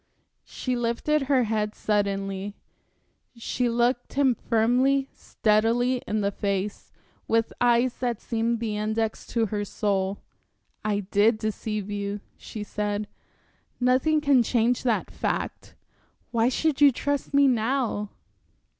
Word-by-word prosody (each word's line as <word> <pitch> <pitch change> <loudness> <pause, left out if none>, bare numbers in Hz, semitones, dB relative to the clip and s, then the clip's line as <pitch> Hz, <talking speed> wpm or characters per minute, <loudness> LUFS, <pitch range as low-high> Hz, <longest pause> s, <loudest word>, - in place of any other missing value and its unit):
She 255 -1 -3
lifted 240 +6 0
her 265 -3 +4
head 215 -1 -1
suddenly, 200 -1 -1 0.8
she 240 +1 -1
looked 240 +1 0
him 270 -2 +3
firmly, 250 +5 +2
steadily, 230 +4 +1
in 215 0 0
the 200 0 0
face, 200 0 -3 0.4
with 225 0 +1
eyes 240 +1 +3
that 240 -3 -2
seemed 230 0 -1
the 220 -2 -2
index 220 +1 -2
to 230 -1 +1
her 205 0 -2
soul. 200 -1 -1 0.7
"I 205 -1 0
did 205 +3 +3
deceive 215 -1 -3
you," 205 0 -3 0.2
she 215 - -7
said. 210 0 -3 0.7
"Nothing 260 +5 +3
can 280 -4 +4
change 235 +1 +1
that 235 -4 0
fact. - - -3 0.6
Why 230 0 +3
should 295 +2 0
you 285 -1 +8
trust 285 +3 -2
me 280 -1 +5
now?" 235 -3 0
230 Hz, 125 wpm, -26 LUFS, 210-250 Hz, 0.8 s, you